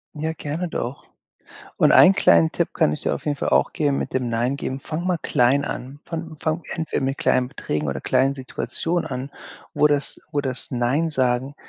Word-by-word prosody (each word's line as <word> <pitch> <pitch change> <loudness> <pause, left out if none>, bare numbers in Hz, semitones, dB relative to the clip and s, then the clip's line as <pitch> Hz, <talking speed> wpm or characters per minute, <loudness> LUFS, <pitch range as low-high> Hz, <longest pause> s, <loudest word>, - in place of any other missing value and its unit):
Ja, 160 +2 -2
gerne 160 +4 -4
doch. 130 -4 -5 0.7
Und - - +5
einen 190 - +8
kleinen 85 - +4
Tipp - - -1
kann 75 - +2
ich - - -4
dir - - 0
auf - - -8
jeden 145 -1 -1
Fall - - -2
auch - - +3
geben 145 -3 +1
mit - - -3
dem 130 -2 -1
„Nein“ 120 +4 0
geben, 130 - -3
fang 160 +5 -5
mal 180 - +2
klein 135 -2 +2
an. 135 +3 -6
Fang 165 -1 -6
fang 160 +2 -2
entweder 160 -1 -2
mit 135 +1 -1
kleinen 125 -2 +2
Beträgen 75 - -3
oder 70 - -3
kleinen 130 +2 +2
Situationen 165 +5 -2
an, 130 +3 -4 0.4
wo 150 - +4
das 145 -1 -1
wo 145 -1 0
das 130 -3 -5
„Nein“ 130 +6 +1
Sagen 130 -1 0
140 Hz, 200 wpm, -23 LUFS, 125-155 Hz, 0.7 s, einen